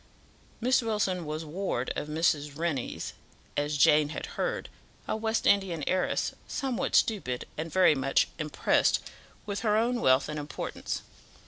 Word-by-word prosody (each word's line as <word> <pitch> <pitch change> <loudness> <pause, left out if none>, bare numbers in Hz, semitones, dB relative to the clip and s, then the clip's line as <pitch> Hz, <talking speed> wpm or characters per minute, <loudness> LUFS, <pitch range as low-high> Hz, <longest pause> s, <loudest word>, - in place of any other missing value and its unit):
Miss 255 +2 +3
Wilson 205 -7 -1
was 155 +1 -4
ward 155 -6 -2
of - - -3
Mrs. 150 -2 0
Rennie's, 160 -6 -2 0.4
as 145 0 0
Jane 150 +1 +5
had - - -4
heard, - - -2 0.4
a - - 0
West 220 +1 -1
Indian 190 -6 +3
heiress, 185 0 0
somewhat 265 -4 -1
stupid, 130 - +1
and 160 +1 -4
very 185 -2 +5
much 135 -1 +2
impressed 155 -1 +2 0.5
with 205 -1 -3
her 215 -2 +2
own 240 +2 +1
wealth 130 +1 +4
and 150 0 -4
importance. 145 0 -4
165 Hz, 140 wpm, -29 LUFS, 150-210 Hz, 0.5 s, Jane